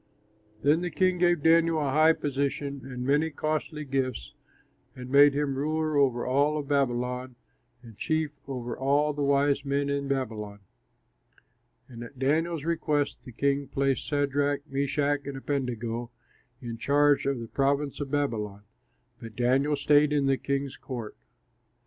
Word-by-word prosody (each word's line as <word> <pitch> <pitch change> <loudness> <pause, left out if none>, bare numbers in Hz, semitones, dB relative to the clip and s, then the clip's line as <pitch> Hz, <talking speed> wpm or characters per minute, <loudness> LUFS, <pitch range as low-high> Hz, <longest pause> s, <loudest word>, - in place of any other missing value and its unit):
Then 150 +4 +3
the 180 - -2
king 185 0 +1
gave 175 -3 +2
Daniel 165 0 +4
a 145 -3 0
high 155 +3 +5
position 140 -1 -3
and 125 0 -5
many 145 +4 +2
costly 155 0 -3
gifts, 130 - -2 0.6
and 125 0 -9
made 140 0 +6
him 145 -1 0
ruler 155 +3 -1
over 130 -4 +2
all 145 +4 +2
of 145 -2 -4
Babylon 125 -2 -1 0.5
and 115 -3 -13
chief 155 -1 0 0.2
over 125 -3 -4
all 145 +3 +1
the 145 - -4
wise 140 0 +2
men 140 0 -1
in 140 0 -2
Babylon. 110 -7 -3 1.3
And 120 -2 -9
at 120 +3 -12
Daniel's 155 +4 0
request 155 -3 0
the 125 - -9
king 140 +3 0
placed 135 0 0
Shadrach, 145 -1 0
Meshach, 140 +1 -1
and 140 -1 -5
Abednego 120 -4 -3 0.5
in 115 -1 -6
charge 145 +1 +3
of 140 -3 0
the 115 - -6
province 140 +2 0
of 145 -2 -4
Babylon; 110 -8 -2 0.6
but 115 -2 -9
Daniel 130 +5 +2
stayed 145 +1 +3
in 145 -2 +2
the 135 0 +3
king's 140 -1 -2
court. 120 -6 -7
140 Hz, 150 wpm, -27 LUFS, 130-145 Hz, 1.3 s, made